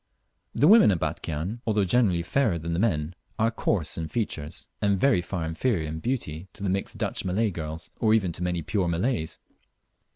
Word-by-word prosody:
The 145 Hz, -, +4 dB
women 220 Hz, -, +8 dB
at 95 Hz, -, +3 dB
Batchian, 85 Hz, +12 st, -3 dB
although 105 Hz, -2 st, +2 dB
generally 95 Hz, -5 st, +2 dB
fairer 105 Hz, +1 st, +1 dB
than 85 Hz, +1 st, -4 dB
the 85 Hz, -, 0 dB
men, 85 Hz, -7 st, +1 dB, 0.2 s
are 110 Hz, +1 st, +2 dB
coarse 90 Hz, -8 st, -1 dB
in 80 Hz, -, -3 dB
features, 80 Hz, -8 st, -4 dB
and 100 Hz, -2 st, +2 dB
very 135 Hz, -7 st, +4 dB
far 85 Hz, -2 st, -3 dB
inferior 80 Hz, +1 st, 0 dB
in 80 Hz, +1 st, -4 dB
beauty 95 Hz, -, -3 dB
to -, -, -9 dB
the 95 Hz, -, +1 dB
mixed 95 Hz, +1 st, -2 dB
Dutch -, -, -2 dB
Malay 100 Hz, +4 st, +1 dB
girls, 80 Hz, -2 st, -6 dB
or 110 Hz, -1 st, +4 dB
even 95 Hz, -6 st, +1 dB
to 85 Hz, -, -8 dB
many 90 Hz, -2 st, -1 dB
pure 95 Hz, +3 st, 0 dB
Malays. 85 Hz, +1 st, -1 dB
90 Hz, 190 wpm, -26 LUFS, 80-110 Hz, 0.2 s, women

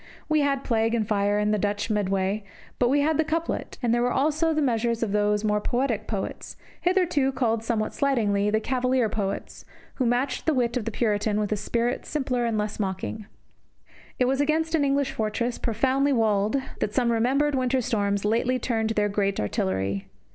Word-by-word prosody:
We 310 Hz, 0 st, +2 dB
had 275 Hz, -1 st, 0 dB
plague, 225 Hz, -1 st, +1 dB
fire, 205 Hz, 0 st, +1 dB
and 210 Hz, 0 st, +1 dB
the 210 Hz, -, +1 dB
Dutch 205 Hz, +1 st, -1 dB
in 220 Hz, -, -1 dB
the 210 Hz, -, +2 dB
Medway, 195 Hz, +1 st, -1 dB, 0.4 s
but 245 Hz, -, +3 dB
we 285 Hz, +2 st, +3 dB
had 310 Hz, +1 st, +1 dB
the -, -, +5 dB
couplet; 325 Hz, +1 st, -3 dB
and 235 Hz, -1 st, +2 dB
there 240 Hz, -, +2 dB
were 245 Hz, +1 st, +1 dB
also 310 Hz, +5 st, +1 dB
the 310 Hz, -, 0 dB
measures 235 Hz, -4 st, +1 dB
of 215 Hz, -, -1 dB
those 210 Hz, 0 st, +1 dB
more 210 Hz, -1 st, +1 dB
poetic 240 Hz, -3 st, -1 dB
poets, 200 Hz, -3 st, -5 dB, 0.2 s
hitherto 350 Hz, -7 st, +2 dB
called 230 Hz, -4 st, 0 dB
somewhat 225 Hz, -2 st, -1 dB
slightingly 210 Hz, -8 st, +1 dB
the 215 Hz, +1 st, +2 dB
Cavalier 255 Hz, 0 st, +1 dB
poets, 200 Hz, -2 st, -4 dB, 0.3 s
who 255 Hz, -, +1 dB
matched 255 Hz, +5 st, -1 dB
the 315 Hz, -, +3 dB
wit 240 Hz, -1 st, +1 dB
of 245 Hz, -4 st, -2 dB
the 230 Hz, -, -2 dB
Puritan 210 Hz, -1 st, 0 dB
with 210 Hz, -1 st, -2 dB
a -, -, +2 dB
spirit 235 Hz, +3 st, -1 dB
simpler 255 Hz, -5 st, -1 dB
and 230 Hz, -2 st, 0 dB
less 210 Hz, +1 st, -2 dB
mocking. 195 Hz, +1 st, -3 dB, 0.9 s
It 250 Hz, -, +2 dB
was 270 Hz, +2 st, +1 dB
against 320 Hz, +2 st, +1 dB
an 315 Hz, -3 st, +3 dB
English 275 Hz, -1 st, +1 dB
fortress, 235 Hz, +2 st, -2 dB
profoundly 265 Hz, +5 st, +1 dB
walled, 215 Hz, 0 st, +2 dB, 0.2 s
that 210 Hz, -, -2 dB
some 245 Hz, -2 st, +2 dB
remembered 265 Hz, +6 st, +2 dB
winter 260 Hz, 0 st, +1 dB
storms 205 Hz, -4 st, 0 dB
lately 235 Hz, +4 st, +1 dB
turned 225 Hz, -3 st, -1 dB
their 210 Hz, -2 st, +1 dB
great 200 Hz, -1 st, 0 dB
artillery. 95 Hz, -1 st, -1 dB
230 Hz, 190 wpm, -25 LUFS, 210-265 Hz, 0.9 s, the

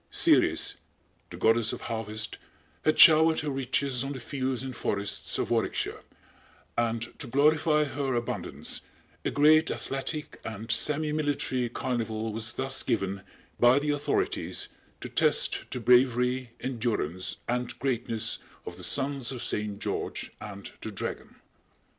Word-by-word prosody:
Ceres, -, -, +3 dB, 0.5 s
the -, -, -8 dB
Goddess 115 Hz, 0 st, +3 dB
of -, -, -6 dB
Harvest, 110 Hz, -1 st, -4 dB, 0.4 s
had 155 Hz, -, +3 dB
showered 160 Hz, 0 st, +8 dB
her 150 Hz, -1 st, -2 dB
riches 135 Hz, -1 st, 0 dB
on 140 Hz, +1 st, -3 dB
the 130 Hz, -, -6 dB
fields 130 Hz, 0 st, -2 dB
and 130 Hz, -2 st, -5 dB
forests 100 Hz, -1 st, -2 dB
of -, -, -2 dB
Warwickshire, -, -, 0 dB, 0.7 s
and 115 Hz, 0 st, -1 dB
to -, -, -4 dB
glorify 150 Hz, +3 st, +3 dB
her 140 Hz, -2 st, -2 dB
abundance, 120 Hz, 0 st, -3 dB, 0.4 s
a -, -, 0 dB
great 155 Hz, +2 st, +5 dB
athletic 140 Hz, +3 st, -4 dB
and 110 Hz, +1 st, -6 dB
semimilitary 145 Hz, -2 st, 0 dB
carnival 115 Hz, -4 st, -2 dB
was 115 Hz, +1 st, -2 dB
thus 135 Hz, 0 st, -1 dB
given 100 Hz, -5 st, -1 dB, 0.4 s
by 120 Hz, +2 st, +6 dB
the 145 Hz, +1 st, +1 dB
authorities 145 Hz, 0 st, -1 dB, 0.3 s
to -, -, -5 dB
test -, -, +2 dB
the 125 Hz, -, -4 dB
bravery, 125 Hz, +1 st, +3 dB
endurance 110 Hz, -, -2 dB
and 120 Hz, 0 st, -2 dB
greatness 120 Hz, -4 st, -1 dB, 0.3 s
of 85 Hz, -, -7 dB
the 90 Hz, -, -10 dB
sons 135 Hz, +2 st, 0 dB
of 125 Hz, -3 st, -5 dB
Saint 105 Hz, -1 st, -2 dB
George -, -, -3 dB
and 100 Hz, -2 st, -8 dB
the -, -, -4 dB
Dragon. 100 Hz, -, -5 dB
125 Hz, 135 wpm, -28 LUFS, 115-140 Hz, 0.7 s, showered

